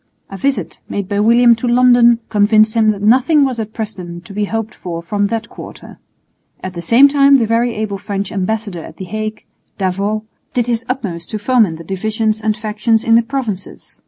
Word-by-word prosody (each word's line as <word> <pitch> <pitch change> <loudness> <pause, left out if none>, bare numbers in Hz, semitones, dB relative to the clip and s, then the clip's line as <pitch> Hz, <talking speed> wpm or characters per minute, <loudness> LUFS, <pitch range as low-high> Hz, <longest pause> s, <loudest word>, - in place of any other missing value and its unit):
A - - -6
visit 275 +4 -2
made 200 -2 -3
by 205 0 -1
William 235 +3 +5
to 245 - -3
London 240 -1 +5
convinced 215 +1 +3
him 220 -2 +3
that 205 -1 -2
nothing 265 +7 +4
was 255 -3 -3
at 220 -1 -4
present 180 -6 -7
to 200 - -11
be 205 +1 -1
hoped 225 +1 -4
for 170 -2 -6
from 205 +3 -1
that 230 +1 -3
quarter. - - -12 0.6
At 185 - -5
the 170 - -6
same 235 +11 +6
time 280 0 +4
the 245 -4 +3
very 230 +2 0
able 210 -2 -3
French 200 -1 -4
ambassador 200 -3 -3
at - - -12
the 190 - -7
Hague, 215 +3 -5 0.3
D'Avaux, 200 +3 -1 0.3
did 245 -2 +1
his 235 -1 -1
utmost 190 -10 -4
to 215 - -3
foment 210 -6 +2
the 165 - -10
divisions 215 +4 -2
and 215 0 -1
factions 215 +1 0
in 230 - +2
the 230 - +6
Provinces. 225 -6 -6
215 Hz, 195 wpm, -16 LUFS, 200-235 Hz, 0.6 s, same